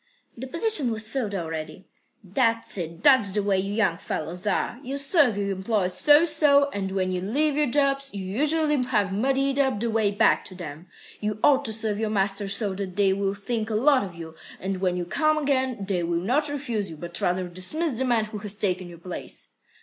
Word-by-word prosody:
"The 260 +3 -7
position 335 - +2
was 220 -1 -1
filled 220 -4 -3
already." 160 -1 -5 0.4
"That's 230 +4 +1
it. 170 -1 -3
That's 260 -9 +5
the 205 0 +1
way 195 -1 +1
you 195 +2 -3
young 190 -7 +1
fellows 175 +5 -4
are. 225 +4 -1
You 275 0 -4
serve 280 - +4
your 200 -1 -1
employers 190 -1 -1
so 295 +3 +5
so, 285 -3 +3
and 195 -4 -3
when 185 -1 -1
you 180 -1 -2
leave 280 +10 0
your 300 0 +2
jobs, 275 +1 +1
you 195 -2 -6
usually 300 +7 +1
have 210 -6 0
muddied 270 +5 +1
up 265 -6 +1
the 230 +1 -1
way 220 -2 +2
back 205 +2 +3
to 185 - -10
them. 165 -1 -9 0.3
You 210 0 -2
ought 285 -1 +4
to 220 - -3
serve 215 -1 -2
your 220 -1 -1
masters 200 -1 0
so 205 -3 -1
that 190 -1 -5
they 195 -1 +3
will 195 0 -1
think 220 +2 -3
a 220 - -1
lot 265 +3 +4
of 185 -4 -8
you, 165 -1 -9 0.3
and 190 0 -3
when 180 -2 0
you 175 - -3
come 310 - +1
again, 260 -7 0
they 185 -3 0
will 170 0 -1
not 255 - +1
refuse 240 -8 -3
you, 160 - -9
but 170 +2 -3
rather 180 +1 0
dismiss 255 - -2
the - - +1
man 240 -4 +2
who 215 -1 -7
has 205 0 -5
taken 185 -3 -2
your 170 - -11
place." 175 +2 -7
210 Hz, 215 wpm, -25 LUFS, 190-270 Hz, 0.4 s, That's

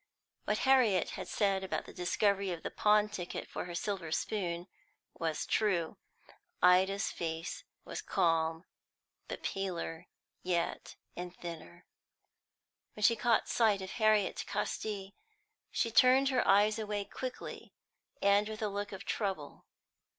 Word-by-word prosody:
What - - +1
Harriet 245 -9 +4
had - - -6
said 195 -2 +1
about 190 - -3
the - - -11
discovery 200 +2 +1
of 170 -2 -5
the - - -4
pawn 210 0 +4
ticket 185 -4 -5
for - - -5
her 175 -1 -6
silver 185 -3 -3
spoon 175 -2 -2 0.5
was 160 -2 -2
true. 175 -7 +1 0.6
Ida's 190 +2 +4
face 165 -1 -4 0.2
was - - -5
calm, 165 0 +1 0.6
but - - -6
paler 180 -3 -3 0.3
yet 175 -2 -2 0.2
and 180 0 -6
thinner. 170 0 -9 1.1
When 210 - -6
she 230 +2 +6
caught 230 0 +2
sight 210 -5 +2
of 190 - -6
Harriet 215 -3 +2
Casti, 200 -2 -3 0.6
she 230 - 0
turned 260 +4 +6
her 255 -2 +1
eyes 210 +2 +5
away 210 -2 -2
quickly, 255 +3 -7 0.5
and 200 +1 +4
with 220 0 -5
a 210 - +1
look 205 +1 -4
of 195 - -8
trouble. 190 -9 -3
195 Hz, 135 wpm, -33 LUFS, 175-215 Hz, 1.1 s, she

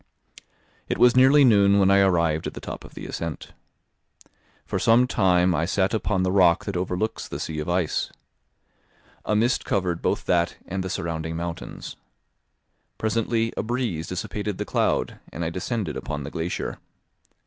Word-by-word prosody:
It - - 0
was 125 0 +5
nearly 135 +3 +6
noon 100 -4 +5
when 95 -1 +4
I 100 - +5
arrived 85 -5 +2
at - - -7
the - - -6
top - - -7
of - - -14
the - - -7
ascent. 85 -3 -6 1.1
For - - -2
some 115 +2 +5
time 90 -6 +3
I 80 - +1
sat 95 +3 0
upon 105 -3 0
the 90 - +1
rock 90 -3 +4
that 100 - -4
overlooks 90 +4 -2
the - - -6
sea 80 -1 -4
of 75 - -4
ice. 85 -2 0 1.1
A 105 - +1
mist 120 +4 +2
covered 90 -3 -1
both - - -1
that 85 -1 +1
and 95 0 -3
the 95 - -4
surrounding 80 -2 -3
mountains. 85 0 -6 1.0
Presently 115 +1 0
a - - -1
breeze 110 -9 -2
dissipated 100 +2 -4
the - - -3
cloud, - - 0
and 85 - -4
I 80 - -2
descended 95 - -3
upon 75 -1 -4
the 70 - -7
glacier. 85 +1 -4
95 Hz, 165 wpm, -24 LUFS, 85-110 Hz, 1.1 s, nearly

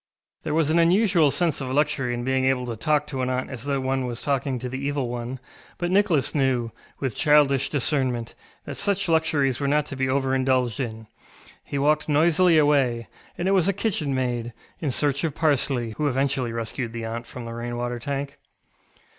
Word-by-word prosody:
ŌĆØ - - -45
There - - -1
was 155 -2 +2
an 170 - +3
unusual 175 -2 +4
sense 165 -1 +1
of 130 - -4
luxury 140 -2 +1
in 120 - -4
being 130 +1 +1
able 130 -1 +1
to 120 -2 -4
talk 150 +6 +1
to 135 -3 -4
an 130 - -1
aunt 130 0 -2
as 130 -1 -6
though 140 -1 0
one 130 -1 -1
was 120 0 -4
talking 140 -2 -1
to 125 - -5
the 130 +1 -5
Evil 140 -3 -1
One, 120 +2 -5 0.4
but 175 0 -2
Nicholas 185 -8 +2
knew, 130 -5 +1 0.3
with 130 -5 -2
childish 145 -3 +3
discernment, 130 -5 0 0.3
that - - -6
such 200 -1 0
luxuries 155 -5 +2
were 140 - -1
not 150 +1 +2
to 140 - -7
be 130 0 -1
over 135 0 +1
indulged 130 -4 +1
in. 110 -4 -4 0.6
He 140 - -4
walked 150 +2 +2
noisily 165 +3 +4
away, 135 -6 +2 0.3
and 175 - -1
it - - +3
was 190 -2 +3
a 200 - +2
kitchenmaid, 130 - -1 0.3
in 155 - -2
search 145 +2 0
of 155 -3 -1
parsley, 135 -6 +1
who 150 - +1
eventually 135 -2 0
rescued 115 +1 -4
the 115 -1 -4
aunt 115 +1 -5
from 125 -2 -8
the 115 - -6
rain 120 +1 -4
water 120 0 -3
tank. 140 +2 -4
135 Hz, 200 wpm, -24 LUFS, 125-150 Hz, 0.6 s, unusual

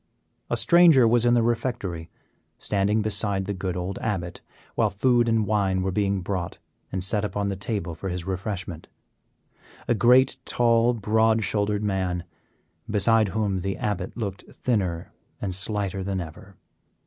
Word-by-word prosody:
A - - +1
stranger 170 -8 +6
was 120 +1 +3
in 120 - +4
the 120 - +3
refectory, 110 -8 -2 0.5
standing 105 +2 0
beside 100 -2 0
the 100 - -2
good 95 -1 -3
old 90 +2 -4
Abbot, 95 -6 -3 0.3
while - - +2
food 120 +4 +2
and 110 -2 +2
wine 95 -3 +1
were 95 - -1
being 100 0 0
brought 90 -2 -4 0.3
and 95 -1 -2
set 100 +2 +1
upon 100 0 -2
the 100 - -2
table 100 -3 -4
for 95 +4 -5
his 90 -1 -4
refreshment; 95 -3 -4 1.0
a - - +3
great, 125 +5 +4
tall, 120 0 +2
broad 110 +1 +2
shouldered 105 0 0
man, 95 -4 -1 0.7
beside 110 +1 +3
whom 100 -2 -1
the 95 +2 -3
Abbot 100 -1 -3
looked 100 -4 -4
thinner 95 -9 -2 0.3
and 95 -2 -3
slighter 100 0 -2
than 95 0 -2
ever. 90 +3 -9
100 Hz, 150 wpm, -25 LUFS, 95-110 Hz, 1.0 s, stranger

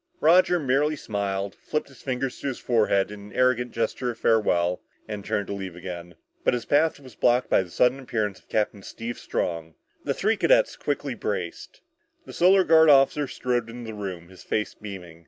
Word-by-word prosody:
Roger 180 +2 +5
merely 145 +2 +1
smiled, 100 -5 -3
flipped 150 - -3
his 135 - -17
fingers 130 -1 -3
to - - -4
his 130 - -2
forehead 105 -4 +1
in 105 - -8
an 100 0 -12
arrogant 125 -1 +2
gesture 115 +2 -2
of 115 - -5
farewell 90 -7 +2 0.3
and 105 -2 -5
turned 100 0 -1
to - - -5
leave 95 -3 -6
again. 85 -1 -8 0.3
But - - +3
his 120 -2 -4
path 155 +2 +2
was 130 -4 -14
blocked 125 +3 +2
by - - +5
the 90 - -8
sudden 125 +8 +2
appearance 110 -7 -2
of - - -32
Captain 105 -1 -1
Steve 115 +4 -7
Strong. 80 -2 -3 0.3
The - - -1
three 220 +2 +1
cadets - - +3
quickly - - -2
braced. - - -5 0.4
The - - -10
Solar 185 +2 +5
Guard 160 -2 +6
officer 140 +1 +5
strode 120 -2 -2
into 115 -1 -7
the - - -9
room, 90 -4 -6
his 95 - -14
face 105 - -2
beaming. 90 -5 -9
115 Hz, 190 wpm, -25 LUFS, 100-135 Hz, 0.4 s, Guard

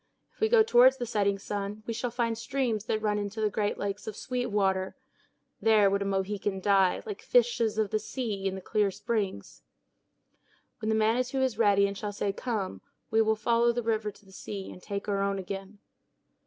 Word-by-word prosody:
If - - -31
we 440 - +2
go 455 -1 +6
toward 255 - +6
the 245 - -3
setting 200 -3 +1
sun, 205 +1 -5
we 230 - -3
shall 235 +2 -2
find 230 -1 -1
streams 230 -2 -2
that 220 -1 -1
run 210 -1 +1
into 205 +1 -4
the 215 -1 +1
great 205 0 -1
lakes 200 +1 -4
of 215 - -4
sweet 250 +1 -3
water; 190 -3 0 0.7
there 215 -3 +5
would 200 0 +1
a - - -1
Mohican 195 0 -1
die, 195 -1 +3
like 420 -3 -6
fishes 355 - +2
of 215 -2 0
the 215 - +1
sea, 210 -6 -3
in 190 - -2
the 190 - -6
clear 210 +1 +1
springs. 200 - -3 1.2
When 220 - -2
the 220 - +2
Manitou 245 +5 +1
is 245 -4 -1
ready 200 -3 +5
and 200 0 -2
shall 205 +1 -4
say 200 0 -1
"Come," 215 -4 -3 0.3
we 220 0 +4
will 220 0 +3
follow 235 +2 +2
the 240 0 -2
river 220 -1 0
to 205 0 -16
the 190 - -18
sea, 195 +1 -7
and 180 - -12
take 200 +2 -5
our 200 -1 0
own 200 0 0
again. 195 +2 -6
210 Hz, 205 wpm, -29 LUFS, 200-230 Hz, 1.2 s, go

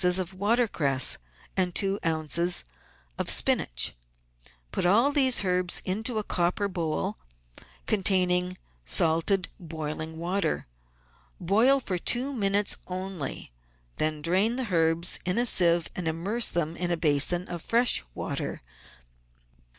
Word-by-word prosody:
of 180 0 +1
water 225 +6 +1
cress 135 -8 0 0.4
and 180 -2 -1
two 195 0 +2
oz. 165 +2 +1 0.6
of - - -1
spinach. - - +3 0.8
Put - - -2
all 225 +10 +3
these 265 -6 +4
herbs 180 -1 +1
into 220 +5 -2
a 215 - -1
copper 180 +2 -1
bowl 165 - -3 0.7
containing 185 -3 +1 0.3
salted, 165 - +1
boiling 160 -1 -6
water. 175 0 -2 0.7
Boil 225 +10 +3
for 185 -8 -3
two 255 +9 +1
minutes 205 -3 0
only; 185 - -5 0.5
then 155 -1 0
drain 190 +8 +1
the 245 -7 -4
herbs 165 +1 +2
in 180 +3 -2
a 240 - +2
sieve 170 -6 +4
and 180 -2 -3
immerse 195 +9 +1
them 165 -1 -2
in 175 -1 -2
a 170 - -1
basin 160 +3 +1
of 175 -1 -6
fresh 235 - +3
water. - - -5
180 Hz, 125 wpm, -26 LUFS, 165-200 Hz, 0.8 s, these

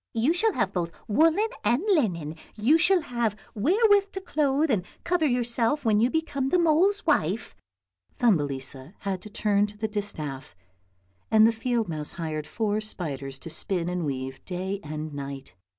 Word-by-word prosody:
" - - -65
You 305 +7 +4
shall 435 +4 +2
have 205 - 0
both 170 -2 -2 0.2
woollen 325 - +3 0.2
and 240 +8 +2
linen, 175 - +1 0.2
you 255 +10 +4
shall 365 +2 +4
have 235 -6 -1 0.2
wherewith 400 - +3
to 385 - -3
clothe 300 -4 +1
and 200 -6 +1 0.2
cover 345 -3 +2
yourself 245 +2 +1
when 215 -2 +4
you 235 +3 +3
become 280 -3 -1
the 360 - +3
mole's 345 +5 +3
wife." 220 - 0 0.6
Thumbelisa 145 - 0
had 190 -2 -3
to 215 - -10
turn 205 0 +1
the 220 +1 -1
distaff 155 -10 -5 0.7
and 220 0 +6
the 225 - +5
field 230 0 -1
mouse 155 -3 -3
hired 155 -3 -4
four 215 +3 -1
spiders 140 -10 -5
to 160 +4 -7
spin 175 +1 -1
and 180 -1 -2
weave 130 -2 -4
day 190 +2 -4
and 155 0 -5
night. 140 -3 -7
215 Hz, 165 wpm, -26 LUFS, -, 0.7 s, and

